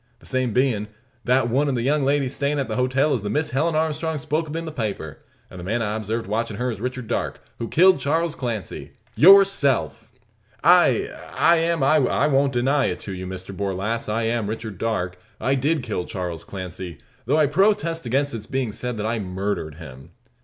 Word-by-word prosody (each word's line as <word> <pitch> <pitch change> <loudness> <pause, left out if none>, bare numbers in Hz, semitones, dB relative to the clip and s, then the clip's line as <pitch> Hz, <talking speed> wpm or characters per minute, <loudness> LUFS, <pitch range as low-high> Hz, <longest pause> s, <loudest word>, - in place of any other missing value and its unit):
The - - -20
same 130 -2 0
bein', 115 -3 +1 0.4
that 125 -1 +3
one 140 +5 +1
of 135 - 0
the 120 - -1
young 145 +2 +2
ladies 140 -1 +1
stayin' 145 +1 -1
at 140 - -1
the - - -3
hotel 130 +4 +2
is 120 - -1
the 105 - -4
Miss 150 +7 -1
Helen 155 +5 +1
Armstrong 160 0 -1
spoke 155 +2 -2
of 150 - -5
in 165 0 -3
the 160 - -5
paper; 105 - -4 0.3
and 95 - -11
the - - -7
man 115 +5 -1
I 105 0 -2
observed 110 +1 -3
watchin' 110 0 -2
her 125 +2 -1
is 105 -3 -7
Richard 125 -1 -4
Darke, - - -2 0.2
who 115 - -3
killed 185 +3 +5
Charles 160 +3 0
Clancy 115 -7 -5 0.2
yourself!" 195 -7 +5 0.5
"I - - +5 0.3
I 170 0 +5
am 165 -2 +1
I 155 +3 +4
won't 130 - +1
I 150 - +2
don't 140 -1 +2
deny 135 +3 +2
it - - -2
to 100 - -6
you, 95 0 -6
Mr 95 +1 -6
Borlasse. 100 +4 -2
I 115 +2 0
am 115 -2 0
Richard 110 -4 -6
Darke. 90 -6 -2 0.2
I 135 - +1
did 140 +2 +1
kill 105 -7 -3
Charles 85 -3 -4
Clancy; 90 -2 -7 0.3
though - - +3
I 155 - +5
protest 165 - +1
against 140 +3 0
its 110 -2 -6
being 130 -4 -2
said 125 +1 -5
I 110 +2 -1
murdered 95 -5 -3
him." 70 -5 -11
125 Hz, 205 wpm, -23 LUFS, 105-145 Hz, 0.5 s, killed